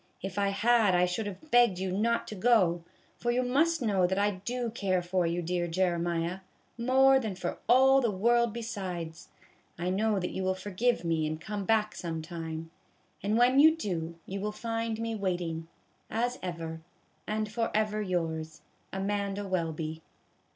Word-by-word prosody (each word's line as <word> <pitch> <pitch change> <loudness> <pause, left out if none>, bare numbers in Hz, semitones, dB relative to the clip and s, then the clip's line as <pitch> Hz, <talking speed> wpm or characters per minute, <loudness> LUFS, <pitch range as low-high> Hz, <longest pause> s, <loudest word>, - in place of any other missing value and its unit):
If 195 +1 -3
I 200 - +2
had 215 -1 +3
I 180 0 +4
should 180 +4 -2
have 205 +11 -9
begged 240 -6 +5
you 185 0 -2
not 230 +5 0
to - - -6
go, 185 -5 +3 0.4
for 240 - -1
you 245 +1 +2
must 285 +4 +2
know 195 -5 +3
that 190 +1 -1
I 205 +1 +3
do 235 +5 -3
care 190 -5 0
for 180 0 0
you, 170 +1 -1
dear 175 +1 -1
Jeremiah, 170 0 0 0.4
more 265 +3 +5
than 220 -6 -3
for - - -4
all 265 +2 +6
the 235 - +2
world 235 +4 +2
besides. 185 -8 -5 0.5
I 175 +1 -1
know 210 +1 +1
that 180 - -3
you - - -3
will 185 0 +1
forgive 205 +2 0
me 160 -2 +1
and 155 0 -3
come 200 +3 -4
back 215 0 +2
some 165 -2 -4
time; 165 -1 -6 0.5
and 210 +3 +1
when 250 +3 +5
you 315 +2 +7
do, 170 - -3
you 195 +1 -5
will 210 +2 -2
find 225 0 -3
me 230 0 -2
waiting, 175 -5 -2 0.4
as 245 +2 -1
ever, 165 -2 -5 0.5
and 215 0 -2
forever 215 -2 0
yours, 160 -4 -3 0.3
AMANDA 200 +1 -2
WELBY. 160 -3 -2
195 Hz, 170 wpm, -29 LUFS, 175-230 Hz, 0.5 s, you